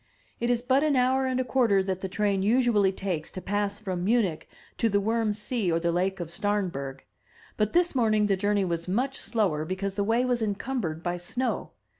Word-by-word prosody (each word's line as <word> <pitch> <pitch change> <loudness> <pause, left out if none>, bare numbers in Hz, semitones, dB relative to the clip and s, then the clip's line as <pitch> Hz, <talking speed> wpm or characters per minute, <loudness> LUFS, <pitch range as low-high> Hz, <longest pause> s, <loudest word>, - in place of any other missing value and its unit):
It 235 - 0
is 240 -1 +1
but 260 +2 +3
an 300 -2 +2
hour 260 +1 +2
and 255 0 0
a - - +2
quarter 235 -7 +2
that 190 -1 -3
the 190 - -3
train 200 0 0
usually 215 -2 +3
takes 180 -5 -3
to - - -5
pass 205 +1 -1
from 185 -4 -4
Munich 205 -6 +1 0.3
to 230 - +3
the 200 -1 +2
Wurm 220 +1 +1
See 210 -3 -1
or 165 - +2
Lake 180 +3 0
of 170 -2 -5
Stamberg; 170 -9 -2 0.5
but 210 -1 0
this 350 0 +3
morning 215 -5 +3
the 200 -1 +2
journey 205 +1 +1
was 170 -1 -3
much 255 +8 0
slower, 205 -9 0
because 190 +4 -3
the 200 +1 -1
way 230 +4 +2
was 245 -2 +1
encumbered 205 -6 -2
by 175 0 -1
snow. 245 +9 -3
205 Hz, 200 wpm, -27 LUFS, 185-235 Hz, 0.5 s, but